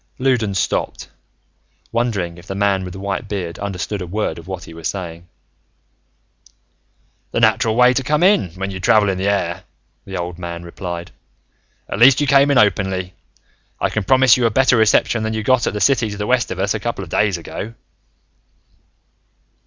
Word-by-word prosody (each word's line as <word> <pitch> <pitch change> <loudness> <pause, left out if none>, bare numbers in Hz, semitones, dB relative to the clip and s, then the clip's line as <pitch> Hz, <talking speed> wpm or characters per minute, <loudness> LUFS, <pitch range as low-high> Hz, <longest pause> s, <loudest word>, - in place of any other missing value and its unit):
Loudons 120 -7 0
stopped, - - -2 0.8
wondering 100 -8 -2
if 85 - -16
the 95 - -5
man 100 -1 +1
with 90 -1 -7
the 95 - -8
white 100 +2 -3
beard 90 -5 -4
understood 100 0 -4
a 90 - -5
word 95 -3 -2
of 85 - -14
what 95 -2 -6
he - - -11
was 80 -1 -5
saying. 85 -3 -6 2.0
"The - - 0
natural 110 -1 +3
way 125 +1 +5
to 135 - 0
come 150 +5 0
in, 185 - +4
when 95 +1 -4
you 95 - -6
travel 105 +2 +3
in 95 -1 -2
the 95 - -1
air," 100 0 -1 0.4
the 95 -1 -6
old 90 0 -5
man 85 -1 -6
replied. 85 0 -7 0.8
"At - - -5
least, 125 +2 +7
you 145 - +1
came 140 0 +4
in 140 - +3
openly. 95 -3 +1 0.7
I - - 0
can 110 - -1
promise 130 +3 +5
you 120 -2 +2
a - - +1
better 130 +3 +3
reception 110 +1 +3
than 110 0 -2
that - - -2
you 110 - -3
got 130 +1 +2
at - - -1
the - - -2
city 115 +2 +2
to 105 - -6
the 105 - -3
west 125 +1 +1
of 95 - -5
us 100 +2 0
a 110 - -3
couple 110 -2 -4
of 80 - -11
days 105 -3 +1
ago." 105 +6 -7
100 Hz, 195 wpm, -19 LUFS, 90-115 Hz, 2.0 s, least